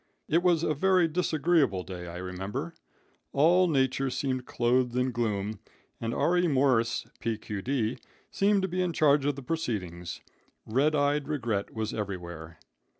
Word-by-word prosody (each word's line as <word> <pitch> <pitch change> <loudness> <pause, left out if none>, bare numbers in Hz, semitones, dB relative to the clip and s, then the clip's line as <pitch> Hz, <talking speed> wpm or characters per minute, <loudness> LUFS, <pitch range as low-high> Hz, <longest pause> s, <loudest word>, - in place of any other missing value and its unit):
It 165 +3 +3
was 175 -3 +3
a 155 - +1
very 180 +3 +3
disagreeable 155 - +1
day, 90 -1 -7
I 85 +1 -7
remember. 90 +2 -5 0.6
All 175 +6 +5
nature 135 -3 +1
seemed 130 -1 -2
clothed 125 0 +1
in 125 +1 +1
gloom, 110 -3 -2 0.4
and 115 - -2
R.E. 175 +7 +2
Morse, 130 -5 +2
P.D.Q., 115 +2 -2 0.3
seemed 200 0 +2
to - - +1
be 185 0 -1
in 180 -2 0
charge 145 -2 +4
of 145 -1 +1
the 140 - -8
proceedings. 95 - -4 0.4
Redeyed 145 +3 +1
Regret 120 -9 -2
was 110 -1 -2
everywhere. 85 -5 -6
130 Hz, 140 wpm, -28 LUFS, 105-155 Hz, 0.6 s, All